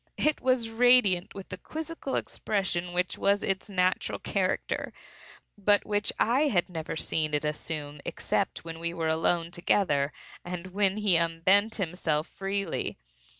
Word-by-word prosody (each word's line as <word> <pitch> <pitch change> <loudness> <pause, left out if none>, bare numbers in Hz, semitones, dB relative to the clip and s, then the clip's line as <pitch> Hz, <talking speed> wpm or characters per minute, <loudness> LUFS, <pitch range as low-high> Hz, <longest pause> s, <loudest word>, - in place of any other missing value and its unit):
It 305 -1 +1
was 255 -3 +2
radiant 225 -6 +4
with 195 -1 -8
the 185 - -7
quizzical 315 - -5
expression 180 -4 -1
which 180 +1 -1
was 200 0 +2
its 195 +2 -2
natural 185 -1 +1
character, - - -1 0.7
but 205 +1 +4
which 205 0 +1
I 265 +7 +3
had 185 -11 +1
never 160 -3 -4
seen 155 -1 -1
it 150 - -1
assume 150 -1 -4
except - - -2
when 165 0 -7
we 170 0 -3
were 165 -2 0
alone 165 +1 +1
together, 170 -5 +1 0.3
and 180 +1 -6
when 200 0 +2
he 205 -5 +4
unbent 185 +6 +3
himself 165 -4 -1
freely. 195 -2 -3
185 Hz, 145 wpm, -28 LUFS, 165-205 Hz, 0.7 s, radiant